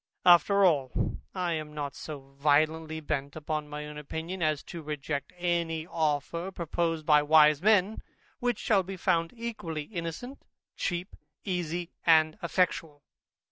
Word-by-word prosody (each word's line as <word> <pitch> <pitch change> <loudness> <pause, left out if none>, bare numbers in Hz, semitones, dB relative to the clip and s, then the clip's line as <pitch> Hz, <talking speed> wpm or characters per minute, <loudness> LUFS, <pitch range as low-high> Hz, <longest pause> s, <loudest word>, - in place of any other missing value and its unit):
After 195 +3 +6
all, 140 -7 +1 0.2
I 180 -2 0
am 155 -1 -5
not 145 -2 -3
so 135 -3 -9
violently 155 +2 +2
bent 140 -2 -3
upon 155 -1 -3
my 150 0 -5
own 150 0 -7
opinion, 165 +5 -5
as 155 -2 +1
to 170 - -8
reject 150 -2 -4
any 170 -2 -1
offer, 160 +2 -1
proposed 165 -2 -2
by 150 -1 +6
wise 150 0 +5
men, 210 0 +3 0.4
which 245 -4 0
shall 205 -4 +2
be 190 +1 -7
found 165 -1 +1
equally 215 -10 -4
innocent, 175 - -6 0.3
cheap, 180 0 -3 0.3
easy, 175 -2 -3
and 155 -1 +5
effectual. 165 -4 0
160 Hz, 140 wpm, -29 LUFS, 150-175 Hz, 0.4 s, After